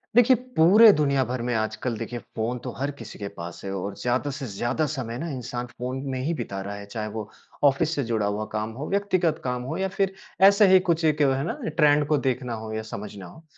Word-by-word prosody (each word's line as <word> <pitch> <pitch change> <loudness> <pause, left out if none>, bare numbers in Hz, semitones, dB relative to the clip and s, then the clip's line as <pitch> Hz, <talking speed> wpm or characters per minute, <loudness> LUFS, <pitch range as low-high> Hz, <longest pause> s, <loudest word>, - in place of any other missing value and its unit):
देखिए 245 +1 +7 0.2
पूरे 210 +7 +8
दुनिया 140 -3 +2
भर 125 -1 -2
में 120 - 0
आजकल 110 +2 -2
देखिए 120 +2 -5
फ़ोन 120 +2 -4
तो 125 - -4
हर 140 +3 -1
किसी 115 - -9
के 100 - -4
पास 85 0 -7
है 95 - -3
और 100 +2 -4
ज़्यादा 125 +4 0
से 140 - -5
ज़्यादा 120 +9 -1
समय 120 -4 -4
ना 170 - -4
इंसान 125 -3 -4
फ़ोन 125 +2 -5
में 130 - -2
ही 165 - 0
बिता 115 -9 -4
रहा 100 - -5
है। 100 0 -8
चाहे 110 -2 -3
वो 105 -1 -5 0.4
ऑफिस 155 +4 0
से 140 - 0
जुड़ा 110 -2 +1
हुआ 105 +1 -1
काम 110 +1 -2
हो, 140 +6 -6
व्यक्तिगत 185 -5 +1
काम 125 -1 -2
हो 130 - -4
या 190 - 0
फिर 195 -1 +1 0.4
ऐसे 200 0 +5
ही 190 - +9
कुछ 170 -3 0
एक 150 -1 +2
है 135 -1 +3
ना - - -3
ट्रेंड 150 -2 +3
को 150 0 +3
देखना 125 -1 -3
हो 110 - -6
या 110 - -2
समझना 100 -2 -7
हो। 160 - -13
130 Hz, 235 wpm, -25 LUFS, 110-155 Hz, 0.4 s, ही